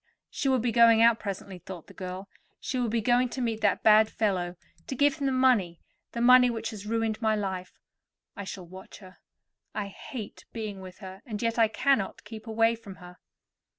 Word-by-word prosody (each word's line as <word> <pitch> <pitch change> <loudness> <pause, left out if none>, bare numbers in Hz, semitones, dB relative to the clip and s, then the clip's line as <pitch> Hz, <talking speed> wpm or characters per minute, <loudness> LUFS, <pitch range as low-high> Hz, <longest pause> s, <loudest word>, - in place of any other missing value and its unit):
"She 275 - -1
will 260 - +3
be 240 0 0
going 230 -1 +6
out 230 -1 +5
presently," 195 -2 -6
thought 175 -1 -9
the - - -15
girl. 185 +1 -7 0.3
"She 255 - -3
will 240 -2 0
be 230 +1 0
going 245 +3 +2
to 260 - -6
meet 225 -3 -2
that 205 -2 +1
bad 215 0 +6
fellow, 185 -6 -1 0.3
to 265 - -4
give 285 +2 +3
him 280 -2 -1
the - - +1
money—the 235 -4 0
money 250 +1 +7
which 230 -1 -3
has 210 -1 -9
ruined 225 0 -1
my 220 -1 +2
life. 190 -3 -4 0.6
I 200 - -6
shall 190 -1 -7
watch 185 +2 -12
her. 185 -2 -15 0.6
I 205 -1 -3
hate 215 +2 -9
being 215 -4 -5
with 185 -1 -11
her, 190 +1 -10
and 220 -6 -6
yet 230 0 0
I 225 - +6
cannot 260 -2 0
keep 220 0 -10
away 225 +1 +3
from 225 -4 -10
her." 180 -1 -14
220 Hz, 200 wpm, -28 LUFS, 195-235 Hz, 0.6 s, money